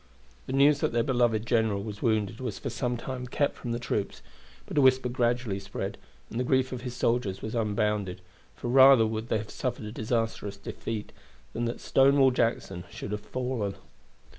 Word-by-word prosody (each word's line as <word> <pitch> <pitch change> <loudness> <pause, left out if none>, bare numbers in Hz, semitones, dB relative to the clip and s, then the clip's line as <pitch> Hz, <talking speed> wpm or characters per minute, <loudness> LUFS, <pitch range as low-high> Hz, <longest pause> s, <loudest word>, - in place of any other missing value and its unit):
The - - -4
news 140 +1 +5
that 120 - 0
their 120 0 +2
beloved 120 -4 +1
general 110 -4 +1
was 105 -1 -7
wounded 110 -1 0
was 125 -5 -4
for 135 - -4
some 120 +1 -1
time 125 +1 -5
kept 140 +3 0
from 120 - -5
the 120 - 0
troops; 105 -4 -3 0.4
but - - -7
a 145 - +5
whisper 130 -1 +4
gradually 120 -4 0
spread, 100 0 -5 0.4
and 115 - -3
the - - +1
grief 130 0 +2
of 125 -2 -4
his 125 -1 -5
soldiers 115 -5 0
was 110 - -4
unbounded, 105 -4 -1 0.3
for - - -6
rather 130 -1 +7
would 110 +1 -3
they - - +2
have 105 0 -6
suffered 125 -4 -3
a 105 - -6
disastrous 110 -3 -2
defeat 105 +2 -5 0.4
than 120 +2 -1
that 115 - -3
Stonewall 135 0 +5
Jackson 115 -7 -1
should 100 - -7
have 105 0 -3
fallen. 125 -6 -3
115 Hz, 190 wpm, -28 LUFS, 105-125 Hz, 0.4 s, rather